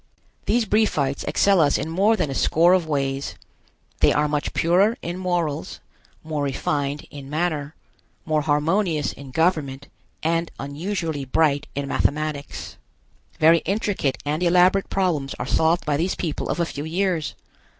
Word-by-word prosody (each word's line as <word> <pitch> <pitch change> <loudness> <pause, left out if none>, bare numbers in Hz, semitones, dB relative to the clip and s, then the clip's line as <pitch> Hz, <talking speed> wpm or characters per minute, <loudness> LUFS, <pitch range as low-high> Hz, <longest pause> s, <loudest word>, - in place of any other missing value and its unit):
These 235 -1 +2
Briefites 175 -11 +1
excel 195 -3 +3
us 145 -2 +3
in 145 - -3
more 195 +7 +3
than 150 -9 -1
a - - -2
score 170 +6 +4
of 180 -4 +2
ways. 140 -2 -2 0.6
They - - +5
are 150 0 +2
much 150 0 -1
purer 190 +7 +3
in 175 +2 -4
morals, 175 -5 -2 0.4
more 155 -2 -3
refined 145 +1 -2
in 140 -2 -9
manner, 155 -2 -2 0.5
more 155 -1 +1
harmonious 155 +2 +1
in 140 -1 -11
government, 145 -3 0 0.3
and 165 +1 0
unusually 160 +1 -3
bright 145 +1 +1
in 140 0 -2
mathematics. 145 +1 -2 0.6
Very 165 +2 +6
intricate 195 -6 -1
and 150 +3 -1
elaborate 180 +2 +4
problems 160 -8 0
are 120 - -4
solved 160 +5 +2
by 150 -2 +1
these 175 +5 0
people 160 -4 -3
of - - -1
a 170 - +2
few 145 -3 -6
years. 170 -1 -1
155 Hz, 150 wpm, -23 LUFS, 145-180 Hz, 0.6 s, Very